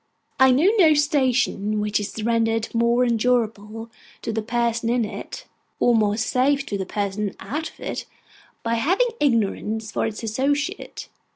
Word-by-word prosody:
I 265 0 +7
know 275 +8 +4
no 315 -4 +6
station 255 -8 +1
which 210 0 0
is 210 +1 -5
rendered 225 -1 0
more 235 +2 +3
endurable 225 -2 -1 0.3
to 225 - -3
the 220 - -1
person 235 0 -1
in 240 -1 +1
it, 210 - -8 0.3
or 245 - +4
more 210 -2 +2
safe 270 +5 +1
to 200 - -3
the 190 - -3
person 200 0 -2
out 295 +11 -4
of - - -22
it, - - -5 0.6
by 230 - 0
having 385 - +2
ignorance 220 -3 0
for - - 0
its 220 +1 -6
associate. 285 - -2
230 Hz, 155 wpm, -23 LUFS, 215-260 Hz, 0.6 s, I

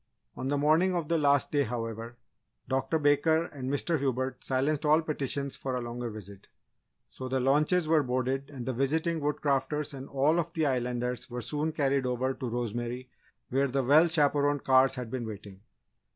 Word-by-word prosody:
On 130 - -4
the 145 +1 +1
morning 160 +6 +3
of 165 -4 -2
the 165 -1 +2
last 140 -2 +3
day, 145 - +2
however, 115 -1 -4 0.5
Dr. 135 +4 0
Baker 155 +2 +3
and 130 -5 -6
Mr. 150 +3 0
Hubert 130 -1 -2
silenced 140 +3 0
all 155 +2 +4
petitions 140 -2 -3
for 130 -2 -4
a 125 - -2
longer 120 0 -4
visit. 100 -2 -11 0.6
So, 130 -1 -7
the 130 0 0
launches 150 +6 +2
were 160 -1 +4
boarded 130 +1 -1
and 130 -4 -7
the 130 - -2
visiting 160 +6 0
Woodcrafters 145 0 -1
and 135 0 -8
all 145 +5 +2
of 170 0 -3
the 160 -2 0
Islanders 125 -2 -2
were 125 0 -5
soon 150 +4 -2
carried 140 -3 0
over 125 +1 0
to 130 -2 -5
Rosemary 120 +2 -4 0.4
where 135 +2 +2
the 135 +1 0
well 150 +6 +6
chaperoned 145 -3 +2
cars 130 0 +4
had 125 -3 -6
been 125 -3 -3
waiting. 100 -2 -9
135 Hz, 180 wpm, -29 LUFS, 125-150 Hz, 0.6 s, well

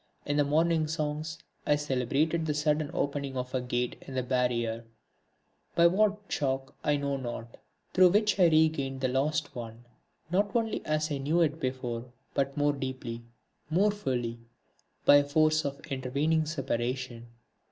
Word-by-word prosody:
In 145 - -1
the 145 - +5
Morning 160 +2 +2
Songs 155 0 -3 0.3
I 150 - +5
celebrated 145 +4 0
the 150 - 0
sudden 150 0 +1
opening 140 -2 -2
of 125 0 -4
a 130 - 0
gate 125 0 -2
in 135 - -7
the 130 - 0
barrier, 120 -2 0 0.9
by 170 - +5
what 205 +4 +4
shock 135 -1 -2
I 145 -1 +2
know 140 -1 -1
not, 120 -2 -6 0.4
through 185 -1 +7
which 210 +1 +2
I 180 - +7
regained 155 -4 +2
the 130 - +2
lost 145 +4 0
one, 115 0 -8 0.5
not 205 +5 +1
only 225 -2 0
as 155 0 0
I 140 - -1
knew 155 +5 +1
it 155 -1 +1
before, 125 -4 -3 0.3
but 135 0 -1
more 145 0 +3
deeply, 130 -4 -5 0.5
more 195 +6 +3
fully, 125 - -2 0.7
by 145 0 +8
force 155 +2 +2
of 140 0 -3
the - - -14
intervening 145 +5 0
separation. 125 -4 -3
145 Hz, 155 wpm, -29 LUFS, 130-155 Hz, 0.9 s, by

